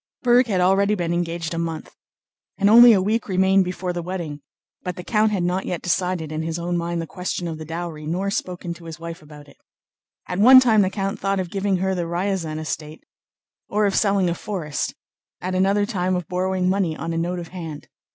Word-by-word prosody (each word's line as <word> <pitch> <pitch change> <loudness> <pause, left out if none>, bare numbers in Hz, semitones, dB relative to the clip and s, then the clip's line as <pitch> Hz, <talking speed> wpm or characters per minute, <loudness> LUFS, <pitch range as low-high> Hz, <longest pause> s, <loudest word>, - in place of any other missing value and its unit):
Berg 245 0 +5
had 190 -4 +1
already 195 +3 +3
been 170 -3 -1
engaged 170 -1 -2
a 165 - -2
month, 165 -2 -4 0.6
and 200 +1 +3
only 240 +1 +10
a 205 - +5
week 220 +3 0
remained 190 +1 +4
before 180 0 -3
the 175 - -3
wedding, 170 -5 -5 0.4
but 180 -1 -4
the 180 - -7
count 215 +1 +2
had 195 -4 0
not 180 +2 -1
yet 175 - -3
decided 175 -3 -1
in 155 0 -3
his 165 +1 -3
own 175 +1 -2
mind 170 0 -2
the 165 - -3
question 180 +1 -4
of 160 -1 -5
the 155 - -7
dowry, 165 -1 -6
nor 190 +5 -1
spoken 180 -3 -3
to 170 0 -14
his 160 -1 -8
wife 170 +1 -7
about 150 -1 -14
it. - - -19 0.7
At 180 - -3
one 255 +5 +9
time 225 -5 +4
the 190 - +2
count 195 0 -3
thought 195 0 0
of 180 -3 -4
giving 195 -1 0
her 190 +1 0
the 175 -2 -2
Ryazán 175 -2 -2
estate 155 0 -5 0.7
or 210 +1 +1
of 200 - +1
selling 200 -3 +2
a 170 - +1
forest, 170 -5 -4 0.4
at 185 +1 -4
another 195 +2 +2
time 185 -4 -1
of 180 -3 -3
borrowing 185 0 -1
money 185 -4 0
on 165 +1 -4
a - - -2
note 175 +2 -2
of 170 -2 -7
hand. 165 -5 -8
180 Hz, 220 wpm, -22 LUFS, 165-195 Hz, 0.7 s, only